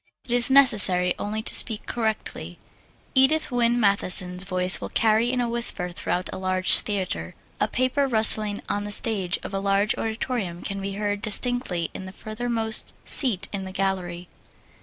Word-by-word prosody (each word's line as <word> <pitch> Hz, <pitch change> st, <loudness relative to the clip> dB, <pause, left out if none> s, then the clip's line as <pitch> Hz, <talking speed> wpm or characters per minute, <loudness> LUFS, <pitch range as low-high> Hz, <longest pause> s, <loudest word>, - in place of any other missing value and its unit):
It -, -, -10 dB
is 245 Hz, 0 st, +4 dB
necessary 205 Hz, -10 st, +3 dB
only 215 Hz, +1 st, -5 dB
to -, -, -1 dB
speak 220 Hz, -2 st, 0 dB
correctly. 220 Hz, -2 st, -5 dB, 0.6 s
Edith 265 Hz, +3 st, +1 dB
Wynne 240 Hz, -1 st, 0 dB
Matthison's 185 Hz, -3 st, +2 dB
voice 185 Hz, -1 st, +2 dB
will -, -, -7 dB
carry 225 Hz, +2 st, 0 dB
in 255 Hz, -, -3 dB
a 245 Hz, -, -2 dB
whisper 230 Hz, -6 st, +5 dB
throughout 180 Hz, +1 st, -4 dB
a -, -, -8 dB
large 185 Hz, 0 st, +4 dB
theater. 185 Hz, -, -5 dB, 0.2 s
A -, -, 0 dB
paper 255 Hz, +3 st, -2 dB
rustling 220 Hz, -3 st, +1 dB
on 205 Hz, -, -4 dB
the 205 Hz, -, -7 dB
stage 200 Hz, -4 st, 0 dB
of -, -, -9 dB
a 195 Hz, -, -3 dB
large 200 Hz, +1 st, -1 dB
auditorium 220 Hz, -5 st, -5 dB
can 195 Hz, 0 st, -6 dB
be 195 Hz, 0 st, -6 dB
heard 205 Hz, 0 st, -4 dB
distinctly 220 Hz, -5 st, -2 dB
in 190 Hz, -, -9 dB
the 190 Hz, -, -10 dB
furthermost 220 Hz, +1 st, -3 dB
seat 205 Hz, -9 st, +6 dB
in 195 Hz, -1 st, -5 dB
the 190 Hz, -, -9 dB
gallery. 185 Hz, -2 st, -4 dB
205 Hz, 165 wpm, -22 LUFS, 185-235 Hz, 0.6 s, seat